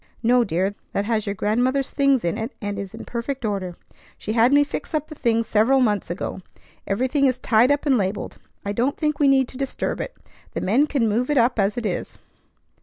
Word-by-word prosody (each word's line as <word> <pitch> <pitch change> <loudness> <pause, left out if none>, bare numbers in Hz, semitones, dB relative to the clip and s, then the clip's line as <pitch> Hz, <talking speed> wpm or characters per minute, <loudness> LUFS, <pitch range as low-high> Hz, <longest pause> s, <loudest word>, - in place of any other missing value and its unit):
"No, 245 +1 +4
dear. 190 0 -1 0.2
That 200 - 0
has 220 -1 -1
your 200 - -2
grandmother's 250 +7 0
things 275 -6 +2
in 170 - 0
it, 225 +4 -4
and 205 -1 -4
is 195 -2 -6
in - - -9
perfect 245 +1 -4
order. 190 -4 -2 0.4
She 215 - -4
had 230 +2 +4
me 290 +1 +6
fix 290 - -5
up 305 0 -2
the - - -7
things 230 -5 +1
several 225 +6 +3
months 210 -6 +1
ago. 175 +2 -4 0.5
Everything 260 +7 +1
is 255 -1 +1
tied 245 +1 +3
up 285 +1 0
and 265 -5 +3
labelled. 195 +1 -3 0.3
I 200 - -2
don't 245 +6 0
think 300 -2 -1
we 290 - +4
need 265 -2 +4
to 255 - -10
disturb 270 -1 -2
it. - - -6 0.4
The - - -3
men 255 +10 +3
can 270 -7 +1
move 235 +5 0
it 295 - +2
up 240 -1 +3
as 200 +2 +1
it 240 - -3
is. 190 - -3
235 Hz, 220 wpm, -23 LUFS, 205-270 Hz, 0.5 s, me